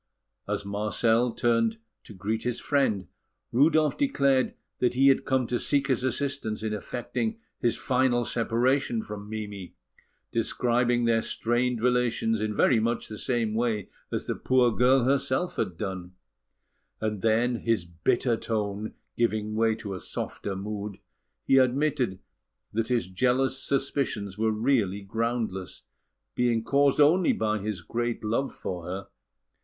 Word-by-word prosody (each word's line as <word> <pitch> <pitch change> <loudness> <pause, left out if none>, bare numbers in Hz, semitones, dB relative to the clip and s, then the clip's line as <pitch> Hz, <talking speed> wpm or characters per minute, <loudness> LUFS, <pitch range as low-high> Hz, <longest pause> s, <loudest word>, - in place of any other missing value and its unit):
As - - -2
Marcel 110 +4 +1
turned 115 -1 +1 0.3
to - - -11
greet 105 +4 -2
his 125 -1 -2
friend, 120 -10 +1 0.4
Rudolf 150 +4 +4
declared 140 - +2 0.2
that 125 -1 +1
he 135 +2 +6
had 135 - +3
come 130 -1 +1
to 120 +1 -1
seek 140 -1 +1
his 130 -2 +1
assistance 130 -5 -2
in 110 -1 -1
effecting 125 - -3 0.2
his 120 - +1
final 125 -2 +1
separation 120 0 +1
from 105 0 -8
Mimi, 105 -4 -6 0.6
describing 120 +1 +1
their 115 -1 +3
strained 120 +1 0
relations 120 -3 +1
in 110 0 0
very 115 +3 +3
much 115 +1 -1
the 105 -1 -7
same 120 -4 0
way 110 -3 -1 0.2
as - - -2
the - - -1
poor 125 -2 +3
girl 125 +1 +4
herself 135 +5 +1
had 95 -6 -2
done; 95 -3 -5 0.9
and 105 -3 -2
then, 115 +3 +2
his 115 -6 0
bitter 115 +8 +1
tone 105 -2 -3 0.2
giving 110 -2 0
way 110 0 +2
to 110 -3 -6
a 95 - -5
softer 100 +2 -4
mood, 105 0 -5 0.5
he 135 - +5
admitted 130 -5 +2 0.6
that 115 +1 0
his 120 -5 +1
jealous 130 +8 +1
suspicions 135 -8 -1
were 110 +2 +1
really 110 -3 +1
groundless, 110 -2 -3 0.5
being 120 -2 +1
caused 140 +3 +3
only 160 +5 +5
by 110 -1 0
his 100 -3 -4
great 120 +4 -2
love 115 +6 0
for 90 -3 -6
her. 95 +2 -5
115 Hz, 140 wpm, -27 LUFS, 105-130 Hz, 0.9 s, he